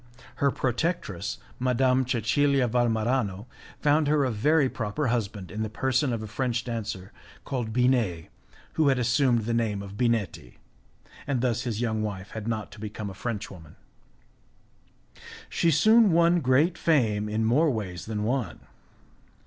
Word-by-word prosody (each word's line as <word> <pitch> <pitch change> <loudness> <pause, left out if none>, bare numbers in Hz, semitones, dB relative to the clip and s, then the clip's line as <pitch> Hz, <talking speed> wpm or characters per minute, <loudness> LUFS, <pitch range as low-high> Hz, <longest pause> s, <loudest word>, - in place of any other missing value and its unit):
Her 140 - +3
protectress, 130 - -2 0.2
Madame 130 0 +2
Cecilia 130 +3 +2
Valmarano, 115 -3 0 0.4
found 150 +1 +3
her 145 -1 +3
a 130 - 0
very 145 +7 +3
proper 125 +3 -2
husband 105 -5 -3
in 110 - -4
the 110 - -2
person 130 +4 0
of 115 -2 -3
a - - -6
French 120 +1 -2
dancer, 105 -5 -5 0.3
called 120 -5 -3
Binet, 115 -9 +1 0.4
who 155 -2 +2
had 135 -2 +3
assumed 125 -1 +2
the 115 - -1
name 110 -4 -1
of 100 0 -9
Binetti, 110 - -1 0.7
and 135 -4 0
thus 125 -2 0
his 115 -2 -2
young 110 -2 -1
wife 100 -2 -5
had 110 -1 -6
not 110 -2 -3
to - - -12
become 105 -1 -6
a - - -9
French 105 +2 -5
woman; 80 -5 -13 1.7
she 170 - +1
soon 215 +7 +5
won 170 +1 +4
great 150 +5 +2
fame 110 -10 +1
in 110 +1 0
more 145 +8 +3
ways 100 - -4
than 105 -1 -3
one. 120 -5 -2
120 Hz, 150 wpm, -26 LUFS, 105-135 Hz, 1.7 s, soon